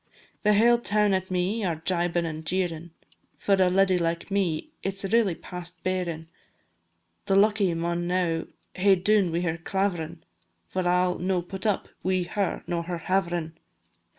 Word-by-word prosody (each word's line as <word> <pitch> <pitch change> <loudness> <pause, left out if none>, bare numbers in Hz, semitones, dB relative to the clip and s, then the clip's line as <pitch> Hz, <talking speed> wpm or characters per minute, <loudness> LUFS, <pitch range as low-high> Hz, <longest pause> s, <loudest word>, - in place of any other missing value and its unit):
The 210 -1 +4
hale 235 +3 +5
toun 210 -3 +2
at 190 0 -1
me 185 +5 0
are 175 -4 0
jibin' 170 +1 0
and 160 -1 -5
jeerin', 170 -1 -2 0.5
For 200 - +1
a 190 -2 +4
leddy 190 0 +3
like 170 +3 -2
me 195 - 0
it 195 0 -3
's 195 +1 -5
really 220 -7 +3
past 180 0 -9
bearin'; 175 -4 -2 1.0
The 195 - +3
lucky 200 -2 +4
maun 170 +1 -1
now 175 -2 0 0.3
hae 195 +1 +4
dune 190 0 +2
wi' 170 +1 0
her 165 -1 -1
claverin', 170 -3 -2 0.5
For 185 -1 -1
I 180 +1 +3
'll 180 -1 -1
no 185 -1 0
put 190 +4 -4
up 205 - 0
wi' 185 0 +1
her 195 +2 -2
nor 170 -1 -1
her 175 +1 -4
haverin'. 175 -2 -1
180 Hz, 165 wpm, -26 LUFS, 170-195 Hz, 1.0 s, hale